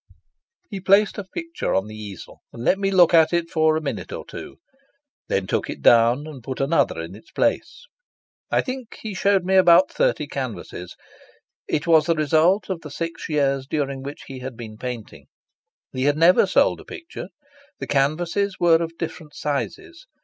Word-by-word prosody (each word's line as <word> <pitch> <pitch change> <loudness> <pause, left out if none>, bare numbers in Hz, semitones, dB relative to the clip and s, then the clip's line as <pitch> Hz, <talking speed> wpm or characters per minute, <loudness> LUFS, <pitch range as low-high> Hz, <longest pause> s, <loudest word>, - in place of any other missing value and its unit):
He 200 - -6
placed 200 +3 +3
a - - -4
picture 335 - -4
on 95 - +1
the 110 - -10
easel, 105 -4 -9
and 115 - -8
let 190 +10 +2
me 195 -1 +1
look 180 -3 +5
at 160 -1 +6
it 170 -1 0
for 155 -1 +3
a - - -3
minute 145 - -5
or - - -6
two; - - -9 0.7
then 95 - 0
took - - -2
it - - -7
down 120 +4 +5
and 150 -5 -9
put 130 +1 -5
another 135 - +1
in 85 +2 -6
its 105 - -15
place. 290 +11 -1 0.6
I - - +2
think 255 -3 -7
he 215 -2 -4
showed 195 0 +2
me 190 - 0
about 185 +9 +6
thirty - - +1
canvases. - - -6 0.7
It 145 - -1
was 160 -2 +4
the 165 - +3
result 160 +6 +2
of 185 -4 -4
the 150 - -9
six 165 +3 -5
years 140 -3 0
during 140 -3 -2
which 140 +2 -8
he 135 -1 -8
had 125 -2 -7
been 110 -3 -8
painting. 120 -1 -7 0.7
He 130 +1 -1
had 145 +1 +2
never 170 +3 +5
sold - - +2
a - - -13
picture. 335 -1 -9 0.5
The - - -5
canvases 170 +8 0
were 170 -1 +4
of 165 0 -5
different 160 -2 -7
sizes. 320 - -4
160 Hz, 185 wpm, -23 LUFS, 135-190 Hz, 0.7 s, at